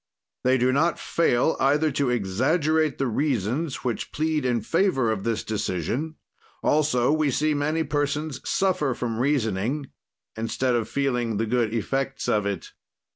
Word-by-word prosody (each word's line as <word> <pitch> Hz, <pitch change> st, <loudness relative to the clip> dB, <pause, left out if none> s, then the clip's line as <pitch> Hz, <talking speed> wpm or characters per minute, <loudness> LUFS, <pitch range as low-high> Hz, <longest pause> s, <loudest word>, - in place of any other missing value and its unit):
"They 130 Hz, +1 st, +4 dB
do 125 Hz, +1 st, +2 dB
not 165 Hz, +5 st, +2 dB
fail 160 Hz, -2 st, +1 dB
either 145 Hz, +3 st, +3 dB
to 140 Hz, -1 st, 0 dB
exaggerate 140 Hz, -, +1 dB
the 135 Hz, -, 0 dB
reasons 130 Hz, -, -1 dB
which 120 Hz, -3 st, -3 dB
plead 155 Hz, -2 st, 0 dB
in 120 Hz, -2 st, +1 dB
favor 165 Hz, -, +1 dB
of 100 Hz, -3 st, -3 dB
this 115 Hz, -1 st, -1 dB
decision; 110 Hz, -, -2 dB, 0.5 s
also 145 Hz, -4 st, +2 dB
we 155 Hz, -1 st, +2 dB
see 150 Hz, +4 st, +1 dB
many 155 Hz, +3 st, 0 dB
persons 145 Hz, -1 st, -2 dB
suffer 150 Hz, -9 st, +1 dB
from 115 Hz, -2 st, -3 dB
reasoning, 130 Hz, 0 st, 0 dB, 0.4 s
instead 115 Hz, +3 st, -1 dB
of 115 Hz, -2 st, -1 dB
feeling 125 Hz, -6 st, 0 dB
the 115 Hz, -, 0 dB
good 115 Hz, -1 st, +1 dB
effects 135 Hz, +4 st, -2 dB
of 105 Hz, -1 st, +1 dB
it." 100 Hz, -4 st, -4 dB
130 Hz, 145 wpm, -25 LUFS, 115-150 Hz, 0.5 s, They